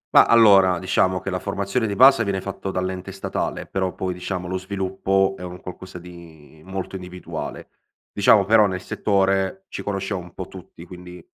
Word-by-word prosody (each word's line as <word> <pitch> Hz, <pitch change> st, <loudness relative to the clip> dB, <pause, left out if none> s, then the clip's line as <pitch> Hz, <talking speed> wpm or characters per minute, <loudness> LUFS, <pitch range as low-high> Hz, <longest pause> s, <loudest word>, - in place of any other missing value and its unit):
Mah, -, -, +9 dB
allora, 100 Hz, -6 st, +6 dB
diciamo 95 Hz, 0 st, +1 dB
che 95 Hz, -, -4 dB
la 90 Hz, -, -2 dB
formazione 100 Hz, +4 st, -2 dB
di 100 Hz, -, -3 dB
base 130 Hz, +1 st, +7 dB
viene 100 Hz, -2 st, -1 dB
fatto 95 Hz, 0 st, -6 dB
dall'ente 95 Hz, 0 st, -3 dB
statale, -, -, -4 dB
però 95 Hz, -1 st, -2 dB
poi, 95 Hz, -1 st, -3 dB
diciamo, 90 Hz, 0 st, -5 dB
lo 95 Hz, +1 st, -2 dB
sviluppo 95 Hz, 0 st, 0 dB
è -, -, -10 dB
un 90 Hz, 0 st, -7 dB
qualcosa 90 Hz, 0 st, -9 dB
di 85 Hz, -3 st, -14 dB
molto 95 Hz, +1 st, -6 dB
individuale. 90 Hz, -1 st, -7 dB, 0.4 s
Diciamo 100 Hz, 0 st, +4 dB
però, 110 Hz, +1 st, +5 dB
nel 95 Hz, -1 st, -3 dB
settore, 95 Hz, -, 0 dB
ci -, -, -6 dB
conosciamo 100 Hz, -1 st, -3 dB
un 90 Hz, 0 st, -14 dB
po' 95 Hz, -, -6 dB
tutti 90 Hz, -2 st, -12 dB
quindi 90 Hz, -1 st, -12 dB
95 Hz, 175 wpm, -22 LUFS, 90-100 Hz, 0.4 s, Mah